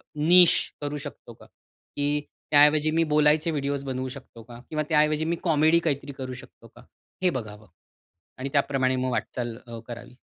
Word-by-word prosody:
निश 175 Hz, +3 st, +6 dB, 0.3 s
करू 145 Hz, 0 st, -3 dB
शकतो 140 Hz, -4 st, -9 dB
का? -, -, -17 dB
की 145 Hz, +1 st, -5 dB, 0.3 s
त्या 145 Hz, -1 st, +7 dB
ऐवजी 155 Hz, +1 st, +2 dB
मी 165 Hz, +1 st, +2 dB
बोलायचे 150 Hz, +1 st, +3 dB
व्हिडिओज़् 140 Hz, -1 st, -2 dB
बनवू 130 Hz, 0 st, -3 dB
शकतो 125 Hz, -3 st, -12 dB
का? 120 Hz, +1 st, -12 dB
किंवा 155 Hz, -1 st, -1 dB
त्या 150 Hz, -1 st, +4 dB
ऐवजी 155 Hz, +1 st, +1 dB
मी 170 Hz, +1 st, 0 dB
कॉमेडी 160 Hz, 0 st, +4 dB
काहीतरी 140 Hz, -1 st, -2 dB
करू 130 Hz, -1 st, -5 dB
शकतो 125 Hz, -, -13 dB
का? -, -, -14 dB, 0.4 s
हे 180 Hz, -, +4 dB
बघावं. 110 Hz, -, -6 dB, 0.7 s
आणि 135 Hz, +2 st, -4 dB
त्याप्रमाणे 135 Hz, -2 st, +1 dB
मग 130 Hz, 0 st, -1 dB
वाटचाल 120 Hz, -1 st, -3 dB
अ, 115 Hz, -1 st, -8 dB
करावी. 120 Hz, +1 st, -9 dB
145 Hz, 175 wpm, -25 LUFS, 130-155 Hz, 0.7 s, त्या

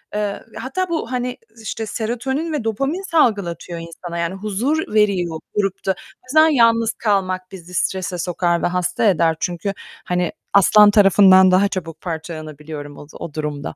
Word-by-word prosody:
eee, 210 Hz, -1 st, -2 dB
hatta 355 Hz, +9 st, -3 dB
bu, 320 Hz, -8 st, -3 dB
hani, 250 Hz, 0 st, -2 dB, 0.2 s
işte 220 Hz, +1 st, -4 dB
serotonin 255 Hz, +9 st, -3 dB
ve 295 Hz, -, -2 dB
dopamin 275 Hz, -, -1 dB
salgılatıyor 195 Hz, -, +1 dB
insana. 170 Hz, +1 st, -8 dB
Yani, 170 Hz, +2 st, -2 dB
huzur 215 Hz, +10 st, -2 dB
veriyor 185 Hz, -6 st, +1 dB, 0.2 s
grupta. 195 Hz, -1 st, -1 dB, 0.3 s
Bazen 310 Hz, +5 st, +5 dB
yalnız 230 Hz, -5 st, +3 dB
kalmak 185 Hz, -4 st, -1 dB
bizi 180 Hz, -1 st, -11 dB
strese 185 Hz, 0 st, -1 dB
sokar 175 Hz, 0 st, 0 dB
ve -, -, +3 dB
hasta 180 Hz, +3 st, -1 dB
eder 165 Hz, -5 st, +3 dB
çünkü, 180 Hz, +2 st, -2 dB, 0.3 s
hani, 180 Hz, -1 st, -1 dB, 0.2 s
aslan 205 Hz, +1 st, +7 dB
tarafından 195 Hz, -2 st, +6 dB
daha 190 Hz, +2 st, +4 dB
çabuk 165 Hz, -5 st, -6 dB
parçalanabiliyorum 155 Hz, -3 st, -7 dB
oz 145 Hz, -, -12 dB
o 155 Hz, -, -7 dB
durumda. 150 Hz, -2 st, -4 dB
195 Hz, 145 wpm, -20 LUFS, 170-225 Hz, 0.3 s, aslan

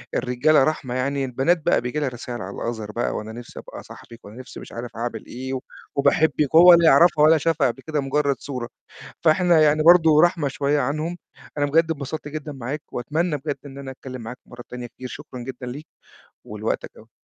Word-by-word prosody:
الرجالة 130 Hz, +4 st, +3 dB
رحمة 135 Hz, -4 st, -2 dB
يعني 135 Hz, +2 st, -1 dB
البنات 135 Hz, +7 st, +1 dB
بقى -, -, +3 dB
بييجي 125 Hz, +5 st, -3 dB
لها 145 Hz, -3 st, -1 dB
رسايل 120 Hz, -1 st, -7 dB
على 100 Hz, 0 st, -7 dB, 0.2 s
الother 110 Hz, -2 st, -7 dB
بقى، 120 Hz, -, -2 dB
"وأنا 110 Hz, +1 st, -5 dB
نِفْسي 120 Hz, +1 st, -10 dB
أبقى -, -, -10 dB
صاحبِك، 115 Hz, 0 st, -14 dB
وأنا 105 Hz, +4 st, -12 dB
نِفْسي 125 Hz, -, -10 dB
مش -, -, -11 dB
عارف 120 Hz, 0 st, -7 dB
أعمل 120 Hz, +1 st, -5 dB
إيه، 130 Hz, +2 st, -5 dB, 0.4 s
وباحبك."، 145 Hz, +1 st, +2 dB
وهو 175 Hz, +2 st, +10 dB
لا 170 Hz, -1 st, +5 dB
يعرفها 155 Hz, +1 st, +5 dB
ولا 160 Hz, +1 st, +6 dB
شافها 160 Hz, -1 st, +1 dB
قبل 125 Hz, +2 st, -4 dB
كده 155 Hz, +1 st, -3 dB
مجرّد 140 Hz, 0 st, 0 dB
صورة، 125 Hz, -4 st, -6 dB, 0.5 s
فإحنا 170 Hz, 0 st, +4 dB
يعني 155 Hz, 0 st, +4 dB
برضه 160 Hz, -2 st, +6 dB
رحمة 170 Hz, -4 st, +2 dB
شوية 140 Hz, +2 st, 0 dB
عنهم 155 Hz, +6 st, -2 dB, 0.4 s
أنا 145 Hz, -, +2 dB
بجد 165 Hz, +3 st, +2 dB
انبسطت 150 Hz, 0 st, -5 dB
جدًا 150 Hz, 0 st, -6 dB
معاك 135 Hz, +3 st, -5 dB
وأتمنى 155 Hz, +6 st, -1 dB
بجد 145 Hz, +1 st, -4 dB
إن 140 Hz, 0 st, -10 dB
أنا 135 Hz, -1 st, -7 dB
أتكلم 130 Hz, -1 st, -9 dB
معاك 120 Hz, +3 st, -8 dB
مَرّة 120 Hz, 0 st, -11 dB
تانية 125 Hz, 0 st, -7 dB
كتير، 125 Hz, +2 st, -10 dB
شكرًا 125 Hz, 0 st, -9 dB
جدًا 125 Hz, +1 st, -7 dB
ليك 140 Hz, +6 st, -7 dB, 0.6 s
ولوقتك -, -, -3 dB
أوي. -, -, -17 dB
140 Hz, 195 wpm, -23 LUFS, 125-155 Hz, 0.6 s, وهو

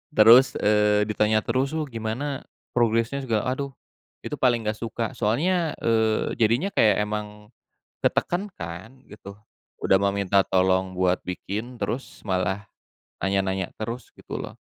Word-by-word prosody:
terus, 115 Hz, +5 st, +7 dB
eee, 105 Hz, 0 st, +3 dB
ditanya 105 Hz, 0 st, +2 dB
terus 135 Hz, +3 st, 0 dB
tuh 160 Hz, -, 0 dB
"Gimana 125 Hz, +4 st, -4 dB, 0.3 s
progresnya?" 115 Hz, +2 st, +2 dB
segala 115 Hz, -5 st, 0 dB
aduh, 140 Hz, +1 st, -3 dB, 0.5 s
itu -, -, -4 dB
paling 120 Hz, -3 st, +2 dB
nggak 105 Hz, 0 st, -1 dB
suka. 115 Hz, 0 st, -3 dB
Soalnya, 155 Hz, -, +1 dB
eee, 110 Hz, -1 st, +2 dB
jadinya 120 Hz, -, +3 dB
kayak 110 Hz, -, +4 dB
emang 105 Hz, 0 st, -5 dB, 0.6 s
ketekan 185 Hz, +4 st, +1 dB
kan, 90 Hz, +10 st, -8 dB
gitu. 100 Hz, -1 st, -10 dB, 0.5 s
Udah 95 Hz, -, +4 dB
mah 100 Hz, 0 st, +2 dB
minta 100 Hz, 0 st, +3 dB
tolong 95 Hz, 0 st, +2 dB
buat 90 Hz, 0 st, +2 dB
bikin, 105 Hz, +7 st, -5 dB
terus 130 Hz, +3 st, -4 dB
malah 95 Hz, +2 st, 0 dB, 0.6 s
nanya-nanya 95 Hz, -1 st, 0 dB
terus 115 Hz, +3 st, -5 dB
gitu -, -, -9 dB
loh. -, -, -7 dB
110 Hz, 135 wpm, -25 LUFS, 100-125 Hz, 0.6 s, terus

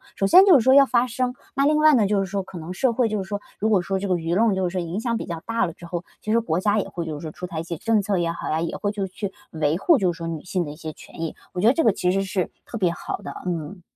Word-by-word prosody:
首 195 Hz, -, 0 dB
先 365 Hz, -, +8 dB
就 365 Hz, -7 st, +8 dB
是 240 Hz, -, +1 dB
说 260 Hz, +2 st, +5 dB
要 280 Hz, 0 st, +8 dB
发 240 Hz, 0 st, +3 dB
声， 250 Hz, +1 st, -2 dB, 0.2 s
那 275 Hz, +1 st, +2 dB
另 305 Hz, 0 st, +3 dB
外 305 Hz, 0 st, +6 dB
呢， 225 Hz, -7 st, +4 dB
就 205 Hz, 0 st, +1 dB
是 195 Hz, -, 0 dB
说 195 Hz, +1 st, -2 dB
可 185 Hz, -1 st, -10 dB
能 165 Hz, +2 st, -6 dB
社 250 Hz, +6 st, +1 dB
会 240 Hz, 0 st, +2 dB
就 215 Hz, -2 st, -1 dB
是 -, -, -6 dB
说， 205 Hz, -, -2 dB, 0.2 s
如 220 Hz, -, +1 dB
果 210 Hz, -3 st, +4 dB
说 190 Hz, +2 st, -2 dB
这 200 Hz, -, -3 dB
个 185 Hz, -, +2 dB
舆 165 Hz, 0 st, -2 dB
论 215 Hz, 0 st, +3 dB
就 190 Hz, -1 st, 0 dB
是 -, -, -4 dB
说 185 Hz, -, -1 dB
影 170 Hz, +4 st, -4 dB
响 230 Hz, 0 st, -1 dB
比 -, -, -5 dB
较 170 Hz, -1 st, -4 dB
大 230 Hz, 0 st, +1 dB
了 165 Hz, -, -6 dB
之 175 Hz, -, -13 dB
后， 175 Hz, 0 st, -4 dB, 0.2 s
其 215 Hz, -, -3 dB
实 230 Hz, -, +4 dB
国 175 Hz, -7 st, -1 dB
家 205 Hz, +2 st, +2 dB
也 -, -, -2 dB
会 170 Hz, -1 st, -5 dB
就 160 Hz, -, -4 dB
是 145 Hz, -, -8 dB
说 155 Hz, -, -5 dB
出 180 Hz, -, -7 dB
台 170 Hz, -3 st, -5 dB
一 -, -, -3 dB
些 170 Hz, 0 st, -5 dB
政 220 Hz, +4 st, +2 dB
策 200 Hz, -1 st, 0 dB
也 170 Hz, -1 st, 0 dB
好 170 Hz, -, -5 dB
呀， 155 Hz, -, 0 dB
也 165 Hz, 0 st, -2 dB
会 205 Hz, -, -1 dB
就 205 Hz, -2 st, -3 dB
是 190 Hz, -, -10 dB
去 200 Hz, -2 st, -4 dB, 0.2 s
维 155 Hz, 0 st, 0 dB
护 305 Hz, -, +4 dB
就 185 Hz, -3 st, +2 dB
是 170 Hz, -, -10 dB
说 165 Hz, -, -6 dB
女 160 Hz, -2 st, -5 dB
性 180 Hz, -1 st, -2 dB
的 145 Hz, -, -6 dB
一 -, -, -9 dB
些 160 Hz, 0 st, -6 dB
权 -, -, -12 dB
益。 165 Hz, -, -3 dB, 0.2 s
我 180 Hz, -, -2 dB
觉 210 Hz, -, +4 dB
得 240 Hz, -, +6 dB
这 325 Hz, -, +1 dB
个 225 Hz, -, +5 dB
其 180 Hz, -1 st, 0 dB
实 195 Hz, +1 st, +1 dB
是 190 Hz, -2 st, -2 dB, 0.2 s
特 -, -, -9 dB
别 185 Hz, -5 st, +2 dB
好 170 Hz, -, -5 dB
的， -, -, -8 dB
嗯。 175 Hz, +1 st, -4 dB
190 Hz, 380 characters per minute, -23 LUFS, 170-225 Hz, 0.2 s, 先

